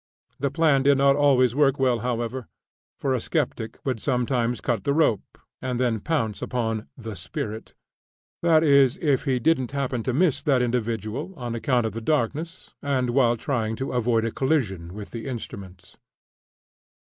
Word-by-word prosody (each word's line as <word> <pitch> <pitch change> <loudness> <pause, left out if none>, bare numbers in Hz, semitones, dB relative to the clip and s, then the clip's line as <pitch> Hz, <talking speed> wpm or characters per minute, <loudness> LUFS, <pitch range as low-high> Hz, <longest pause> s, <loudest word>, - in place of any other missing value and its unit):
The 140 - 0
plan 150 -2 +3
did 140 0 +4
not 140 0 +4
always 135 -4 +4
work 140 0 +3
well, 125 -3 +2
however; 120 +1 -3 0.5
for 135 -2 0
a 130 - +1
skeptic 120 -7 -2
would 130 -4 -1
sometimes 125 -2 0
cut 120 -2 -1
the 140 -1 +1
rope, 135 - +1 0.2
and 125 -1 -2
then 120 -3 +1
pounce 115 -6 -1
upon 115 -3 -2
"the 110 -4 -7
spirit" 105 +5 -6 0.7
that 165 -2 +4
is, 140 -4 +5
if 145 -4 +1
he 130 -3 +1
didn't 130 0 +1
happen 135 -3 -1
to 130 - -1
miss 155 +3 +2
that 130 -4 +2
individual, 120 - -2
on 120 -3 -4
account 120 0 +1
of 110 - -2
the 115 - -5
darkness 155 +6 -2
and 130 -3 0
while 120 -2 +3
trying 115 -3 -1
to 135 +4 -4
avoid 120 -2 +1
a 115 - -1
collision 100 - -1
with 105 -1 -8
the 115 +3 -6
instruments. 95 -7 -8
125 Hz, 165 wpm, -25 LUFS, 115-140 Hz, 0.7 s, is